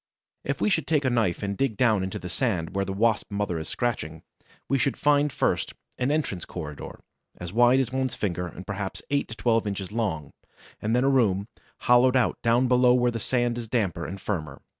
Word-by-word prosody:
If - - -2
we 210 - +2
should 160 - +1
take 150 -3 +1
a 130 - +2
knife 110 -7 0
and 100 0 -2
dig 120 -2 -1
down 110 -6 +3
into 95 - -4
the 90 - -7
sand 90 -3 -1
where 100 0 +1
the 95 - -4
Wasp 110 +2 +1
mother 100 -5 -2
is 80 - -7
scratching, 80 -10 -3 0.4
we 135 - +1
should 135 +2 0
find, 145 0 +3
first, - - -1 0.2
an 125 - +1
entrance 145 - -1
corridor, 75 -4 -7 0.4
as 90 +1 -7
wide 120 +3 +5
as 130 -3 0
one's 130 -2 -1
finger, 90 -3 -2
and 90 +2 -10
perhaps 100 -1 -5
eight 140 0 +1
to 110 - -8
twelve 115 0 +1
inches 100 -1 -4
long, 100 -11 -2 0.5
and 110 +2 0
then 125 - +3
a - - +3
room, 105 -6 +2 0.3
hollowed 125 +1 +5
out 125 - +1
down 120 +2 +3
below 125 0 +5
where 125 -1 +2
the 115 - -4
sand 120 +1 0
is 115 - -6
damper 100 -8 -1
and 95 +2 -6
firmer. 80 -9 -4
115 Hz, 210 wpm, -26 LUFS, 95-125 Hz, 0.5 s, wide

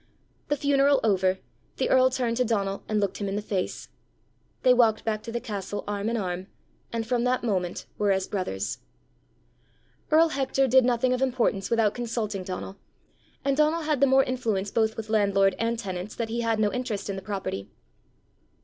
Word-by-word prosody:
The 290 - 0
funeral 280 0 +3
over, 190 -3 +2 0.4
the - - 0
earl 260 0 +6
turned 245 -3 -1
to 250 - +3
Donal 200 -4 -1
and 215 -1 +1
looked 200 -2 -1
him 200 - -3
in 195 - -2
the 205 - -1
face: 195 -3 -3 0.7
they 255 - +6
walked 230 -3 +3
back 215 -1 -1
to 230 - -7
the 235 - -2
castle 205 -4 -5
arm 205 +1 -2
in 235 - -1
arm, 185 -2 -3 0.4
and 230 -1 -2
from 240 0 0
that 250 0 +1
moment 185 -6 -1
were 205 -1 +3
as 190 -1 0
brothers. 105 - -3 1.3
Earl 325 +2 +5
Hector 270 -2 +1
did 260 0 +5
nothing 250 +1 +2
of 255 - -1
importance 240 -7 0
without 225 -3 +2
consulting 225 -5 -3
Donal, 185 +1 -6 0.7
and 275 -1 +2
Donal 305 +3 +2
had 300 -3 0
the 280 - +6
more 265 +1 +5
influence 220 -7 -2
both 220 -1 +1
with 220 -1 -5
landlord 200 -2 +3
and 230 +1 0
tenants 190 -2 -5
that 230 -2 -3
he 235 +1 -2
had 225 -1 0
no 210 -1 +2
interest 240 -5 -3
in 200 - -3
the 190 - -5
property. 190 - -4
225 Hz, 185 wpm, -26 LUFS, 200-250 Hz, 1.3 s, earl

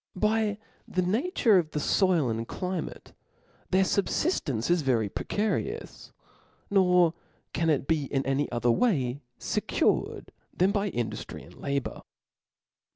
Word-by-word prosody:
By 215 +1 +1 0.3
the 185 - 0
nature 225 - +3
of 160 -3 -2
the 150 - 0
foil 175 -2 +2
and 115 +1 -3
climate, 180 -3 -5 0.6
their 190 +1 +4
fubfiftence 175 - 0
is 175 -1 +3
very 120 -7 +1
precari 210 +1 -1
ous; - - -14 0.6
nor 180 -4 +4 0.4
can 165 -1 +1
it 145 -4 +2
be 150 -4 0
any 135 +1 0
other 120 0 +2
way 140 - +1 0.2
fecured, - - 0 0.3
than 185 +2 +4
by 205 0 0
induftry 120 -9 -4
and - - -15
labour. 140 -2 -3
175 Hz, 125 wpm, -28 LUFS, 135-200 Hz, 0.6 s, their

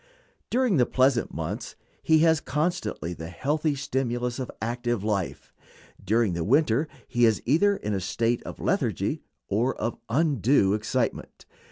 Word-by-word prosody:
During 250 -7 +2
the 125 - +3
pleasant 130 -2 +2
months 85 +9 -5 0.3
he 160 - +4
has 160 -2 +3
constantly 150 - -2
the 80 -1 -7
healthy 145 - -1
stimulus 125 -2 -2
of 130 - -4
active 120 -2 -2
life; 100 -4 -3 0.5
during 110 0 +2
the 85 -1 -2
winter 140 - +2 0.2
he 120 - 0
is 110 -3 +3
either 195 +10 +3
in 105 - -3
a 95 - 0
state 115 +5 0
of - - -9
lethargy - - 0 0.3
or 115 +6 +1
of 115 +2 -3
undue 135 - +3
excitement. 110 +3 -2
120 Hz, 145 wpm, -26 LUFS, 105-145 Hz, 0.5 s, he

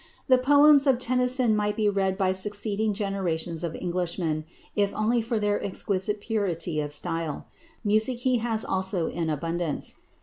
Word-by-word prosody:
The 255 -2 +5
poems 285 +2 +6
of 265 -2 +4
Tennyson 250 -2 +2
might 210 0 0
be 215 -1 +2
read 195 -2 0
by 190 -2 +2
succeeding 205 +2 0
generations 180 -5 -2
of 165 -2 -3
Englishmen 170 -3 -2 0.3
if 200 -1 +1
only 230 +3 +1
for 230 +1 -2
their 205 -1 0
exquisite 200 +1 -1
purity 185 -7 -2
of 145 0 -4
style. 165 0 -3 0.4
Music 215 +4 +3
he 255 -1 +2
has 225 -1 -1
also 190 -2 0
in 165 -1 -3
abundance. 165 +1 -3
205 Hz, 155 wpm, -26 LUFS, 175-225 Hz, 0.4 s, poems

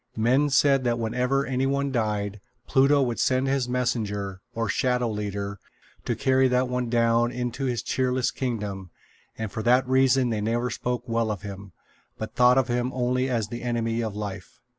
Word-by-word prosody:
Men 130 +6 +3
said 140 -1 +4
that 120 -1 +1
whenever 125 +4 0
any 130 0 0
one 140 0 0
died, 105 -4 -2 0.2
Pluto 135 +1 +4
would 120 -2 -2
send 130 +1 +2
his 135 -2 0
messenger, 105 -6 -2
or 115 -1 -1
Shadow 125 +1 0
Leader, 100 -1 -4 0.5
to - - 0
carry 130 0 +3
that 125 0 +2
one 125 -1 -2
down 115 0 +2
into 125 +2 -3
his 120 -4 -1
cheerless 130 -1 0
kingdom; 105 -7 -4 0.5
and 110 -2 -4
for 110 - -4
that 125 +3 +3
reason 130 -1 +3
they 110 -2 -1
never 120 +3 -1
spoke 125 0 -3
well 115 -1 0
of 105 -4 -4
him, 100 -2 -8 0.4
but - - -6
thought 125 +1 +5
of 130 -1 +3
him 125 +1 -1
only 125 +1 0
as 115 -4 -1
the 120 +1 -6
enemy 115 -1 -1
of 110 -3 -3
life. 105 -1 -7
120 Hz, 180 wpm, -25 LUFS, 110-130 Hz, 0.5 s, thought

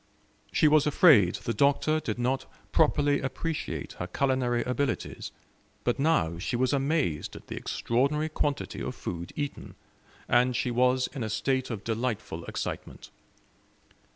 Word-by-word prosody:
She 155 - +4
was 150 0 +4
afraid 140 - +6
the 115 - -3
Doctor 145 +3 +2
did 110 -8 -3
not 125 +2 -1 0.2
properly 145 -2 +3
appreciate 150 +4 -3
her 90 - -3
culinary 125 +2 +1
abilities; 130 +2 -2 0.5
but 120 +2 0
now 110 - +2
she 115 +7 -2
was 130 +2 +1
amazed 140 - 0
at - - -11
the - - -6
extraordinary 140 +6 0
quantity 145 -2 -2
of - - -4
food 85 0 -5
eaten, 145 -1 -5 0.5
and 125 +1 +3
she 125 +1 0
was 125 +1 +3
in 135 - -5
a 110 - -2
state 130 +4 0
of 110 -4 -5
delightful 110 -7 -3
excitement. - - -6
130 Hz, 140 wpm, -28 LUFS, 115-145 Hz, 0.5 s, afraid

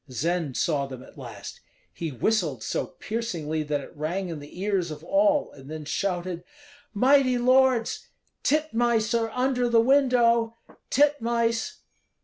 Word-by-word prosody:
Zend 160 +2 -2
saw 145 -4 0
them 130 -2 -9
at - - -16
last; - - -9 0.3
he 165 -2 -4
whistled 150 - 0
so - - -2
piercingly 170 -9 -3
that 150 -1 -2
it - - -12
rang 175 +5 -3
in 160 -3 -5
the 145 +4 -12
ears 195 -3 0
of 155 - -8
all, 295 0 +2
and 135 0 -14
then 155 -1 -6
shouted, 175 0 -2 0.5
"Mighty 255 +3 +4
lords! 255 -1 +2 0.3
titmice 240 -7 +1
are 230 -1 +1
under 250 +1 0
the 230 -1 +5
window, 235 -3 +3 0.3
titmice!" 235 -5 +1
225 Hz, 135 wpm, -26 LUFS, 160-245 Hz, 0.5 s, the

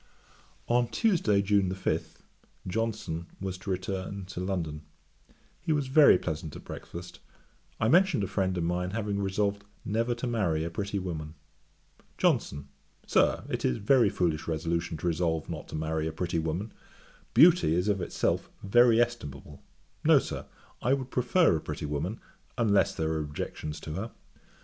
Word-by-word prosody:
On 120 0 +3
Tuesday, 120 - +2
June 100 -2 +2
5, 95 - -2 0.5
Johnson 95 -5 -2
was 95 -1 -3
to 100 - -8
return 95 +1 -3
to 95 -1 -7
London. 85 -5 -2 0.8
He 170 - -1
was 145 -3 0
very 140 -7 +7
pleasant 80 -3 -4
at - - -9
breakfast; 85 +1 -9 0.6
I 110 - +2
mentioned 180 - +4
a - - -1
friend 95 -2 0
of 85 - 0
mine 90 +2 -1
having 105 -2 -1
resolved 100 +1 0 0.2
never 115 +3 0
to 120 - -4
marry 100 -10 0
a 85 - -4
pretty 100 +3 -3
woman. 80 -4 -5 0.8
JOHNSON. 70 0 +1 0.4
'Sir, - - +3
it - - -3
is 60 - +1
a - - -10
very 120 0 +5
foolish 80 -5 -1
resolution 80 0 -1
to 75 - -7
resolve 80 -2 0
not - - -6
to - - -7
marry 80 0 -1
a - - -2
pretty 85 +1 -2
woman. 85 +7 -3 0.6
Beauty 165 - +6
is 90 +3 +1
of 100 -2 +1
itself 85 - -1
very 115 +3 +5
estimable. 75 - -2 0.4
No, - - +7
Sir, - - -3 0.3
I 125 - +2
would 130 -2 -6
prefer 130 - +3
a - - -6
pretty - - -5
woman, 75 +9 -3 0.4
unless 100 -6 +3
there 80 0 -1
are 80 - -1
objections 75 0 -5
to 75 - -6
her. 110 +7 -4
95 Hz, 160 wpm, -29 LUFS, 80-115 Hz, 0.8 s, very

